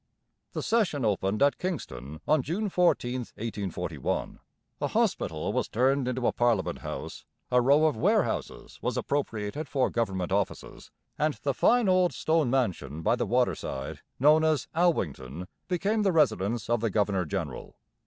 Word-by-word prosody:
The - - -3
session 190 - +1
opened 100 +2 +1
at 145 - +3
Kingston 80 - -5
on 155 -1 +4
June 190 +10 -2
14, 150 -9 +2 0.2
1841. 105 -4 -3 0.4
A - - +1
hospital - - 0
was - - 0
turned 130 +3 +1
into 125 0 -1
a - - +4
parliament 120 -5 +1
house, - - -6 0.3
a 125 0 +5
row 140 +5 +5
of 155 - +2
warehouses 110 - -1
was - - -1
appropriated 135 0 -2
for 130 -3 +1
government 95 -6 -1
offices, 100 0 -3 0.3
and 155 0 +1
the 140 - +1
fine 240 - +3
old 185 -1 +3
stone 160 -4 +1
mansion 90 - -1
by 115 - +3
the 120 - -2
waterside 110 - -1 0.2
known 150 +4 +5
as 155 -2 +1
'Alwington' 90 - 0 0.2
became 200 +5 0
the 200 -2 +3
residence 115 - +1
of 120 0 +1
the 115 0 0
governor 100 -2 +1
general. 75 - -5
125 Hz, 150 wpm, -28 LUFS, 105-155 Hz, 0.4 s, a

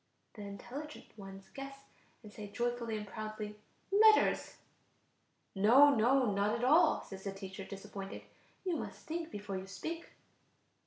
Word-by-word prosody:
The 215 - -10
intelligent 240 +11 -8
ones 195 -2 -11
guess, 275 0 -8 0.4
and 210 -1 -12
say 210 -1 -7
joyfully 240 0 -2
and 210 - -5
proudly: 215 0 -6 0.3
"Letters." 435 +2 +5 1.0
"No, 250 +9 +7
no, 250 0 +4
not 205 +2 +1
at 235 - -4
all!" 305 +7 +5
says 195 -1 -9
the 195 - -1
teacher, 195 0 -7
disappointed; 195 0 -7 0.4
"you 355 -3 0
must - - -7
think 330 0 -3
before 205 -6 -5
you 190 +1 -6
speak." 320 - -6
215 Hz, 140 wpm, -34 LUFS, 200-275 Hz, 1.0 s, No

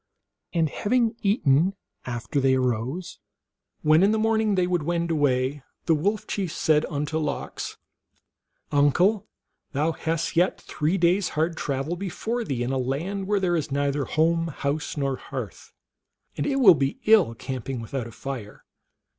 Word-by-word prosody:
And 165 -2 +2
having 230 - +1
eaten 190 - +3 0.3
after 125 +4 -2
they 130 0 +4
arose, 130 +7 -2 0.6
when 155 +2 +5
in 195 - +5
the 220 - +2
morning 220 -1 +2
they 180 -1 +2
would 180 -2 0
wend 170 +2 -1
away, 140 -2 +1 0.2
the 165 - +4
Wolf 200 +8 0
Chief 190 -5 -3
said 155 -1 +2
unto 150 +1 -2
Lox, 150 -2 -4 0.5
" - - -49
Uncle, 180 +9 +3 0.5
thou 150 +4 +1
hast 165 0 -2
yet 175 +3 +2
three 155 +5 -1
days 180 +2 +2
hard 165 +2 +1
travel 140 +3 -2
before 220 +6 -3
thee 130 - -2
in 125 - -2
a 135 - 0
land 170 +10 -2
where 205 0 +2
there 180 -2 +1
is 160 -2 -1
neither 140 0 0
home, 165 +2 +1
house, 150 0 -3
nor 135 -2 -1
hearth, - - -7 0.6
and - - -2
it 280 - +1
will 240 -9 +8
be 140 -2 -1
ill 210 - +5
camping 130 +1 -5
without 115 +1 -4
a - - -10
fire. 115 -3 -7
160 Hz, 160 wpm, -25 LUFS, 135-185 Hz, 0.6 s, will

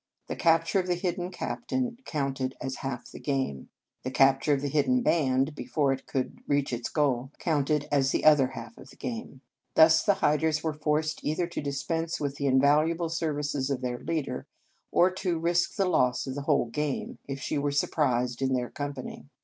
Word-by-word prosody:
The - - -4
capture 165 +2 +3
of 185 - -2
the 180 - +1
hidden 175 0 -2
captain 245 +5 -3
counted 135 -3 -2
as 130 +1 -4
half 135 -3 -5
the - - -9
game. 135 - -2 0.3
The 130 - -3
cap 135 +1 +4
ture 145 - +3
of 135 - -3
the 145 - -1
hidden 155 - +2
band, 135 - +2
before 145 -1 0
it 135 - -8
could 130 -2 -3
reach 145 -2 +1
its 120 0 -3
goal, 135 -4 0
counted 150 -2 0
as 135 -2 +3
the - - 0
other 150 -4 +7
half 130 - -9
of - - -13
the - - -15
game. 230 - -6 0.3
Thus 160 0 +7
the 200 - +3
hiders 150 +1 +1
were 160 -1 0
forced 150 +1 -1
either 155 +4 0
to 170 - -5
dispense 160 +4 -2
with 140 -1 -3
the 140 - -1
invaluable 150 +5 +3
services 145 -4 -1
of 135 -2 -1
their 125 -1 -3
leader, 160 -4 -3 0.4
or 180 +2 +4
to 185 -2 -1
risk 170 +1 +1
the 195 - +2
loss 125 -8 +2
of 135 - -4
the 145 - -4
whole 140 -5 +1
gamej 150 +1 -3
if 135 0 -4
she 145 +1 -2
were 145 0 0
surprised 125 -4 0
in 130 0 +1
their 125 -1 -1
com 145 0 -4
pany. 130 - -8
145 Hz, 200 wpm, -28 LUFS, 135-165 Hz, 0.4 s, other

